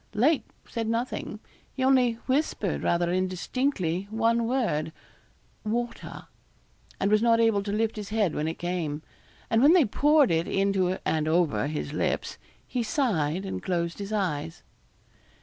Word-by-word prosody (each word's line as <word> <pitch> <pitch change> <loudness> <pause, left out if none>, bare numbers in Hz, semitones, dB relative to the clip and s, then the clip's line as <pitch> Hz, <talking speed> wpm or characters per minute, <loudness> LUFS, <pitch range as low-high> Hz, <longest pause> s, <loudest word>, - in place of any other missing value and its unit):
Lake 280 +8 +2 0.2
said 230 -2 -3
nothing 230 +3 -3 0.4
he 260 - -2
only 260 -3 +4
whispered 260 - 0
rather 170 0 +1
indistinctly 185 - -1
one 230 +1 +1
word, 225 - 0 0.7
'water' 235 +2 -4 0.7
and 200 - +1
was 215 0 +4
not 230 -1 +4
able 225 -3 +3
to 200 0 -4
lift 220 +1 0
his 210 -2 -6
head 210 -6 +1
when 150 - -2
it 160 - -3
came; 165 -4 -3 0.4
and 225 - +2
when 290 +5 +7
they 350 -6 +6
poured 290 - +3
it 165 0 +1
into 195 -2 +1
and 155 -1 0
over 155 -8 +2
his 150 -1 -4
lips, - - -2 0.3
he 250 - -2
sighed 195 - 0
and 190 - -4
closed 170 -2 -2
his 200 +1 -5
eyes. 165 -6 -2
200 Hz, 150 wpm, -27 LUFS, 170-235 Hz, 0.7 s, when